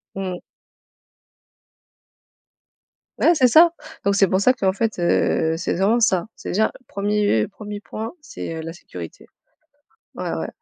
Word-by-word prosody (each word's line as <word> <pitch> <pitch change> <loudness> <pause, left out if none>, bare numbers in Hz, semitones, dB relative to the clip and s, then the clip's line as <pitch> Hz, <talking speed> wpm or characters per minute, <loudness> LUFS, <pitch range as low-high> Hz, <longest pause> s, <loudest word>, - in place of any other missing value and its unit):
Mmh. 185 -2 -4 2.8
Ouais 340 - +5
c'est 255 -4 +5
ça, 325 +7 +7 0.3
donc 200 - +3
c'est 195 -1 +4
pour 190 +1 +1
ça 255 +5 +4
qu'en 190 -6 +1
fait, 225 +2 -1
heu 165 -2 +1
c'est 175 - -2
exactement 205 +6 +2
ça. 190 -3 +2
C'est - - -8
déjà 220 +4 +2 0.2
1er- 205 - +1
1er 210 -1 -8
point, 220 +7 -6
c'est, 165 - -7
heu, 160 - -5
la 165 +1 -6
sécurité. 90 - -10 0.9
Ouais - - -4
ouais. - - -3
200 Hz, 140 wpm, -22 LUFS, 175-220 Hz, 2.8 s, ça